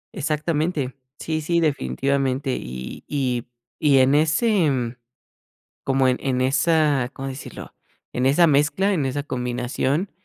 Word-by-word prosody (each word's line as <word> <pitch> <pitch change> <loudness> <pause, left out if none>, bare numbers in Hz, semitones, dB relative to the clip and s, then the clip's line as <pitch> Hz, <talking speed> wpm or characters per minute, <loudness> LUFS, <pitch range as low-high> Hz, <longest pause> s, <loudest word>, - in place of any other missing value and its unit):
Exactamente, 155 -3 -1 0.2
sí, 160 -1 -3
sí 170 +3 +1
definitivamente 135 - 0
y 65 0 -7
y 125 -4 -1 0.3
y 145 -3 +4
en 130 +1 +5
ese, 160 +4 +3
mm, 125 -3 -2 0.9
como 135 -1 +2
en 125 - +2
en 130 -2 -1
esa, 145 -1 +2
¿cómo 135 0 -6
decirlo? 135 +1 -9 0.4
En 125 - 0
esa 145 +6 +5
mezcla, 155 +7 +2
en 155 -6 0
esa 135 +2 -2
combinación, 125 +6 -2
140 Hz, 130 wpm, -23 LUFS, 130-155 Hz, 0.9 s, en